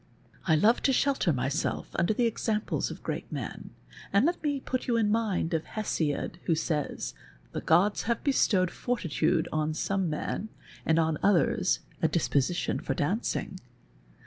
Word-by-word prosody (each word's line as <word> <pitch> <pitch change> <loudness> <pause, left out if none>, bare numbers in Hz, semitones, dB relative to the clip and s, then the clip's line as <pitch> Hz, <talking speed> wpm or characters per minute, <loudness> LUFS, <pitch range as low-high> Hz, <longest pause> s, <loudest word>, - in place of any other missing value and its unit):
I 160 - +5
love 215 +9 +4
to 270 - +3
shelter 270 -9 +2
myself 135 +3 -1
under 170 +4 +1
the 235 +3 +2
examples 220 -1 -1
of - - -9
great - - -4
men, - - -5 0.4
and 200 +6 +4
let 345 +2 0
me 290 -2 0
put 255 -1 -3
you 235 -2 +2
in 215 -2 +2
mind 210 -7 0
of 160 -1 +1
Hesiod, 170 -5 -1
who 165 - +3
says, 155 -2 -2 0.2
' - - -29
The - - -3
gods 185 +6 +3
have 235 - 0
bestowed 195 -10 +3
fortitude 170 - 0
on 155 0 0
some 195 0 0
men, 155 +7 -3 0.4
and 160 - +4
on 160 -2 +1
others 185 -1 +3 0.2
a 160 - +4
disposition 155 0 0
for 135 - -2
dancing.' 185 - -1
185 Hz, 160 wpm, -29 LUFS, 160-225 Hz, 0.4 s, I